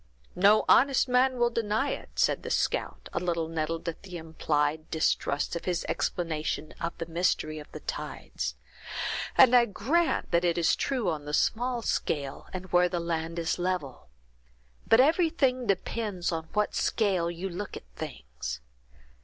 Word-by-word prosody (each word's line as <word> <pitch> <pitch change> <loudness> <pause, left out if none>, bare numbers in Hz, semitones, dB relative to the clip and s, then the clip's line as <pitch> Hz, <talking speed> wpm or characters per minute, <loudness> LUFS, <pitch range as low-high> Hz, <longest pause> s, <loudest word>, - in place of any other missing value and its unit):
"No 200 +4 +5
honest 275 0 +5
man 255 +1 +3
will 240 0 +2
deny 230 +4 0
it," - - -6
said - - +2
the - - -6
scout, - - -1
a - - 0
little 170 -2 -1
nettled 165 +1 -3
at 165 - -4
the 185 -2 -8
implied 155 -1 -1
distrust 155 -1 0
of 170 - -5
his 175 -2 -1
explanation 155 -3 -2
of 170 0 -3
the 165 - -4
mystery 165 -2 0
of 150 - -12
the - - -8
tides; - - -4 0.8
"and 255 -1 +8
I 240 -1 +7
grant 285 - 0
that 170 0 +3
it 175 -1 +2
is 170 -1 +3
true 255 -7 -1
on 150 -2 -5
the 150 0 -1
small 240 +4 0
scale, 140 -8 -2
and 185 0 -5
where 180 0 +4
the 175 -1 -1
land 165 0 -3
is 170 +1 -1
level. 175 - -3 0.8
But 225 - +6
everything 285 -5 +2
depends 195 -1 -1
on 160 -1 -4
what 210 0 +1
scale 190 -6 +1
you 175 +3 -4
look 190 +2 -5
at - - -12
things. - - -6
175 Hz, 160 wpm, -28 LUFS, 160-225 Hz, 0.8 s, and